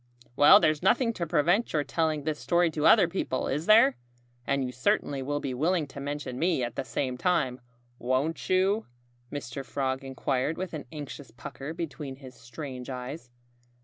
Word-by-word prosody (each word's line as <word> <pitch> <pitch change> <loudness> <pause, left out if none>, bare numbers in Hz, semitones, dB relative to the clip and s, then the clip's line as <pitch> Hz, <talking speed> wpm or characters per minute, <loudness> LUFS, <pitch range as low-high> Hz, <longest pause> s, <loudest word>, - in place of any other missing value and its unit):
"Well, 145 +2 +8
there's 155 -1 +2
nothing 230 +5 +3
to 170 -5 -3
prevent 175 +8 +2
your 150 -2 +2
telling 155 -2 -1
this 155 0 -2
story 175 -1 +2
to 155 0 +1
other 205 -6 +7
people, 170 -7 -2
is 150 +5 -2
there? 215 - +6 0.5
And 140 -1 +1
you 125 - -4
certainly 135 +2 0
will 145 +2 -2
be 135 -3 -3
willing 160 +5 +1
to 140 - -9
mention 140 -2 -4
me 165 -6 +1
at 120 -1 -4
the - - -2
same 130 -1 -3
time, 135 -8 +1 0.4
won't 130 +6 -1
you?" 195 +4 +2 0.4
Mr. 135 -2 -5
Frog 130 0 -2
inquired 135 +2 -1
with 185 -1 -5
an 150 -4 -5
anxious 145 -3 -8
pucker 130 +5 -8
between 150 -4 -5
his 130 -1 -12
strange 125 +2 -8
eyes. 125 +2 -6
145 Hz, 175 wpm, -28 LUFS, 130-165 Hz, 0.5 s, Well